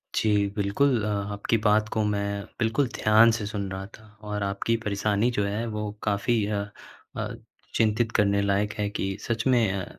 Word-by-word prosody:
जी, 105 -2 +2
बिल्कुल 110 +5 +2
अ, - - -1 0.3
आपकी 105 +3 0
बात 105 0 +2
को 110 - 0
मैं 100 -1 -1 0.2
बिल्कुल 120 +4 +1
ध्यान 110 +2 +5
से 110 -2 -2
सुन 100 -2 -3
रहा 95 0 -5
था 110 - -18 0.2
और 105 -1 -3
आपकी 100 +4 0
परेशानी 105 +3 +1
जो 105 -3 0
है, 105 +3 -2
वो 105 -1 -3
काफ़ी 105 +1 +1
अ 105 -1 -1 0.6
अ, - - -3 0.4
चिंतित 110 +1 +2
करने 100 -1 +3
लायक 100 +1 +1
है 105 -1 0
कि 95 -1 -3
सच 115 +1 -2
में 120 -6 +3
अ, 95 -2 -3
105 Hz, 180 wpm, -26 LUFS, 100-115 Hz, 0.6 s, ध्यान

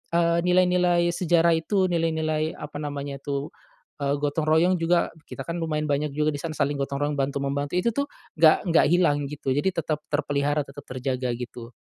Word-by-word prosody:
eee, 170 0 +3
nilai-nilai 180 -1 +3
sejarah 170 -1 +3
itu, 185 +3 +1
nilai-nilai, 160 -2 0
apa 150 0 -7
namanya 140 -1 -5
tuh, 140 +1 -4 0.5
eee, 140 0 0
gotong-royong 155 +5 +2
juga, 170 +1 +2 0.2
kita - - -7
kan 170 +1 -4
lumayan 155 -2 -1
banyak 145 0 -1
juga 150 0 +1
di 145 - -5
sana, 160 +1 -5
saling 145 -1 0
gotong-royong 140 +1 -2
bantu 140 0 -1
membantu. 140 +2 -2
Itu 180 +6 +2
tuh, 280 +5 -1 0.3
nggak 160 -1 +6
nggak 165 - +5
hilang 150 -4 +2
gitu, 140 -1 -4
jadi 145 +8 0
tetap 155 -2 -1
terpelihara, 145 0 0
tetap 140 +1 -12
terjaga, 125 -1 -2
gitu. 120 -1 -8
150 Hz, 170 wpm, -25 LUFS, 140-170 Hz, 0.5 s, nggak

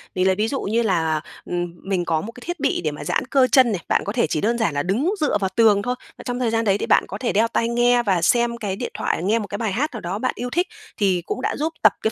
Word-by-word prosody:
Mình 185 0 +1
lấy 190 - +3
ví 210 +3 0
dụ 270 +3 -2
như 225 +4 0
là, 160 -7 +1 0.2
ừm, 175 -1 -3
mình 190 -3 -1
có 160 -2 0
một 225 - -7
cái 245 - -14
thiết 350 -1 -4
bị 280 - 0
để 155 - -1
mà 145 - -8
giãn 145 - -1
cơ 265 -1 +4
chân 255 -4 +6
này, 190 -5 -2
bạn - - +2
có 200 - -3
thể 240 - +2
chỉ 155 - -1
đơn 235 +3 +1
giản 220 -9 0
là 145 0 -1
đứng 245 - 0
dựa 295 -8 +2
vào 190 - +1
tường 215 -3 +5
thôi, 245 +3 -2 0.2
mà - - -10
trong 245 -1 -3
thời 245 -2 +1
gian 225 0 0
đấy 200 -1 +3
thì - - -3
bạn - - +4
có - - -6
thể 250 - -2
đeo 220 +3 +3
tai 230 0 0
nghe 240 0 +3
và 190 -6 +1
xem 235 +5 +2
cái 205 -5 -3
điện - - -5
thoại, - - -1
nghe 215 +5 +2
một 210 - -5
cái 205 - -4
bài 220 -1 -1
hát 270 +11 0
nào 220 - -6
đó 180 +4 -3
bạn - - 0
yêu 245 +1 -4
thích 350 +7 0 0.3
thì 190 -4 +2
cũng - - -4
đã - - -1
giúp 315 +3 -1
tập - - +7
cái 220 - +1
220 Hz, 315 wpm, -22 LUFS, 190-245 Hz, 0.3 s, tập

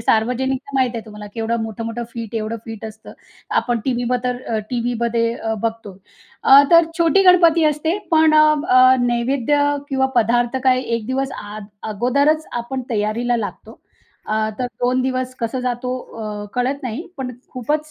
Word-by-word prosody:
सार्वजनिक 250 +4 +1
तर 280 - -11
माहिती 255 -3 +1
आहे 225 - -6
तुम्हाला 210 -1 -10
केवढं 225 0 -1
मोठं-मोठं 230 +2 -5
फिट 230 -2 -7
एवढं 220 +1 -2
फिट 225 -2 -8
असतं. 220 0 -10 0.5
आपण 240 -1 -1
टीव्हीवर 245 -1 0
तर 250 0 -2
अ, 220 - +1
टीव्हीमध्ये 235 -1 0
अ, 225 -2 -3
बघतो. 225 -4 -4 0.5
अ, 275 +1 +8
तर 335 -1 +7
छोटी 340 +4 +4
गणपती 340 -3 +5
असते 305 +4 +1
पण 315 -1 +5
अ, 305 0 +7 0.2
अ, 255 +1 +7
नैवेद्य 245 +4 +1 0.3
किंवा 265 -1 +1
पदार्थ 240 +2 +2
काय 255 -1 +4
1 230 -3 -3
दिवस 265 +1 -2
अ, 210 +1 -8 0.3
अगोदरच 280 +9 +1 0.2
आपण 260 +1 -5
तयारीला 230 +3 0
लागतो. 215 -3 -7 0.5
अ, 215 - -1 0.2
तर 250 - -1
2 250 +1 +2
दिवस 255 0 -2
कसा 235 +2 -2
जातो 250 0 -2 0.3
अ, 210 -1 -5
कळत 260 +3 -1
नाही. 250 +7 -5
पण 265 -2 -4 0.2
खूपच 300 +5 -2
245 Hz, 160 wpm, -20 LUFS, 230-265 Hz, 0.5 s, अ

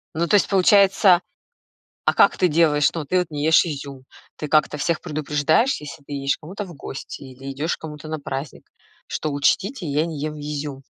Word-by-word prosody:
Ну 170 +2 0
то 210 - +3
есть 200 - +4
получается 195 -1 +5 0.8
а - - +2
как - - +5
ты 180 - +3
делаешь? 150 -2 +3
Ну, 165 -3 -3
ты 185 +6 +1
вот 180 -2 -1
не 145 -1 -3
ешь 160 +2 +5
изюм. 140 -4 -6 0.3
Ты 150 - -6
как-то 150 0 +2
всех 160 +2 -1
предупреждаешь, 155 - +1
если 150 +1 -9
ты 140 - -11
едешь 140 0 0
к - - -43
кому-то 190 +6 -6
в 175 -3 -11
гости 135 -1 -8
или 135 0 -8
идёшь 150 +5 -2
к - - -42
кому-то 150 -1 -8
на 155 0 -3
праздник, 140 0 -6 0.4
что 155 - -3
учтите, 185 - 0
я 150 +1 +1
не 165 -3 -5
ем 150 +1 -3
изюм? 145 -2 -5
150 Hz, 200 wpm, -22 LUFS, 145-170 Hz, 0.8 s, получается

